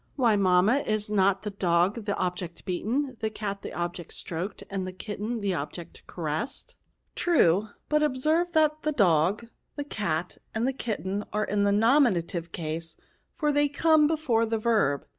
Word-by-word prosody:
'* - - -39
Why, 240 -6 +3
mamma, 195 +6 +4
is 215 -4 -2
not 195 -1 +2
the 210 - -3
dog 190 +3 +1
the 200 - 0
object 180 -1 -4
beaten, 245 +8 -2
the 220 - -1
cat 205 -2 -5
the - - -7
object 175 -1 -4
stroked, 180 +4 -4
and 195 -1 -3
the 185 - -4
kitten 210 +4 -5
the 200 -2 0
object 165 +2 -7
caressed? 175 - -4 0.2
" - - -48
True; 215 - +4 0.2
but 300 0 +2
observe 310 +5 +1
that 310 -1 +3
the 305 - -1
dog, 190 - +3 0.3
the 290 - -3
cat, 180 - -3 0.2
and 225 +3 +1
the 270 - 0
kitten, 205 -5 -3
are 210 0 0
in 205 0 +1
the 200 - +3
nominative 200 - +2
case, 160 0 -5 0.4
for 300 -3 +1
they 290 0 +2
come 310 +1 +4
before 280 -8 +1
the 225 0 0
verb. 215 - +1
210 Hz, 175 wpm, -27 LUFS, 180-260 Hz, 0.4 s, mamma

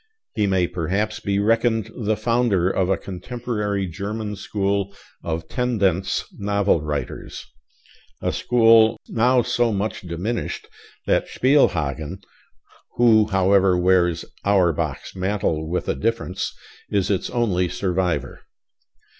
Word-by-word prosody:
He 105 -2 +1
may 95 -2 +2
perhaps 95 +6 -2
be 100 -1 -1
reckoned 115 +1 +1
the 110 -3 -1
founder 115 -5 +1
of 95 -1 0
a 95 - +2
contemporary 105 0 -3
German 105 +4 -4
school 100 0 -2 0.3
of 80 0 -3
tendenz 100 -7 0 0.2
novel 100 -4 +1
writers; 75 -2 -5 0.7
a - - -1
school 115 -2 +4
now 125 +2 +3
so 120 0 +1
much 105 +1 -2
diminished 90 +7 -4 0.4
that - - +1
Spielhagen 90 - +1 0.7
who, 110 -3 +5
however, 95 -1 +3
wears 90 -2 +2 0.2
Auerbach's 95 -5 0
mantle 90 -5 -1
with 90 - -2
a - - +1
difference 115 -4 -2 0.4
is 100 0 0
its 95 - -1
only 100 -8 0
survivor. 90 -2 -2
100 Hz, 115 wpm, -22 LUFS, 90-110 Hz, 0.7 s, who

